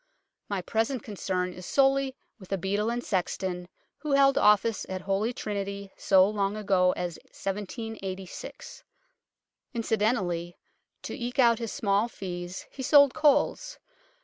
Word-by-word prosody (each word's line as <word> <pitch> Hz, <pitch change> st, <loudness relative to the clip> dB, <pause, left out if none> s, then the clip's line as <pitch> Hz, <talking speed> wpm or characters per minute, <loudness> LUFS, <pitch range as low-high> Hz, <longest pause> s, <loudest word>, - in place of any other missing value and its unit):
My 195 Hz, -3 st, -2 dB
present 225 Hz, +4 st, -1 dB
concern 185 Hz, -3 st, -2 dB
is 180 Hz, -, -10 dB
sorely 270 Hz, -1 st, +3 dB, 0.2 s
with 190 Hz, -2 st, -14 dB
a 195 Hz, -, +1 dB
beadle 200 Hz, +4 st, 0 dB
and 240 Hz, +1 st, -2 dB
sexton, 180 Hz, -2 st, -2 dB, 0.3 s
who 300 Hz, -2 st, -2 dB
held 275 Hz, 0 st, +5 dB
office 210 Hz, +1 st, +4 dB
at 185 Hz, -1 st, -4 dB
Holy 200 Hz, +4 st, 0 dB
Trinity 200 Hz, -3 st, -4 dB
so 190 Hz, -1 st, +5 dB
long 205 Hz, 0 st, -1 dB
ago 190 Hz, -3 st, +3 dB
as 175 Hz, -2 st, -4 dB
1786. 200 Hz, -, -6 dB, 0.9 s
Incident 225 Hz, 0 st, +1 dB
ally, 175 Hz, -3 st, -3 dB, 0.5 s
to -, -, -5 dB
eke 245 Hz, -2 st, -5 dB
out 235 Hz, -3 st, +5 dB
his 230 Hz, -2 st, -4 dB
small 200 Hz, +2 st, +1 dB
fees, 180 Hz, -4 st, -6 dB
he 270 Hz, -, -8 dB
sold 285 Hz, 0 st, +6 dB
coals. 310 Hz, -, +2 dB
205 Hz, 135 wpm, -28 LUFS, 190-240 Hz, 0.9 s, sold